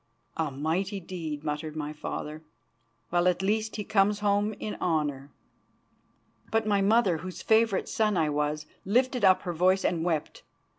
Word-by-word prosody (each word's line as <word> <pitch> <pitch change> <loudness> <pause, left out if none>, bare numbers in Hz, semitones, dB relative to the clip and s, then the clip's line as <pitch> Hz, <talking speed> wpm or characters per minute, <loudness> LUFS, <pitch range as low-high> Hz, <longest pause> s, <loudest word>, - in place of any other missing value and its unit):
"A 160 -2 -1
mighty 165 +9 -2
deed," 165 -5 -6
muttered 150 0 -3
my 150 -1 -4
father. 150 0 -5 0.7
"Well, 175 +1 +3
at 180 +1 +1
least 215 +2 0
he 210 - -3
comes 205 0 +2
home 205 +1 +2
in 215 - -5
honour." 145 -5 -1 1.2
But 225 0 +1
my 205 -2 +2
mother, 200 -3 +3
whose 185 +3 -7
favourite 220 -3 +3
son 215 -6 +1
I 160 -2 +2
was, 150 +1 -1 0.2
lifted 250 +3 +1
up 185 -1 +5
her 175 - -3
voice 185 +3 +2
and 165 -2 +1
wept. 165 -4 -2
185 Hz, 155 wpm, -28 LUFS, 155-205 Hz, 1.2 s, up